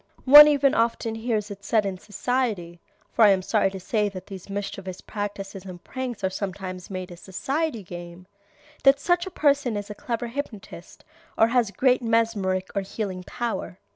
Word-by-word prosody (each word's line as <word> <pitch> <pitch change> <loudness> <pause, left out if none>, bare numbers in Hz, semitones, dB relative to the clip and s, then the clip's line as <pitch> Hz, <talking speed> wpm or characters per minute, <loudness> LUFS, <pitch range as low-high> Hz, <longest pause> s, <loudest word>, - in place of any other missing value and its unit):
One 295 +3 +11
even 285 -2 +3
often 230 0 0
hears 225 -2 -2
it 200 0 -9
said 215 0 +2
in 190 -2 -3
society 205 -6 -2 0.3
(for 230 - +3
I 210 - +8
am 190 -2 +3
sorry 210 0 +2
to 190 0 -8
say 210 +2 0
that 185 -2 -9
these 195 -1 -10
mischievous 195 -2 -5
practices 200 -2 -6
and 180 -2 -10
pranks 255 -5 -5
are 190 - +2
sometimes 190 -1 -5
made 185 -1 -6
a - - -8
society 260 - -3
game) 175 0 -9 0.6
that 275 +1 +6
such 350 +3 +1
a - - -4
person 280 - +1
is 205 0 -6
a - - -4
clever 235 +3 -4
hypnotist 235 -4 -8 0.3
or 225 - +5
has 240 -3 +2
great 250 +6 +2
mesmeric 220 -5 0
or 200 - 0
healing 190 -1 -5
power. 235 -5 -4
205 Hz, 175 wpm, -25 LUFS, 190-240 Hz, 0.6 s, One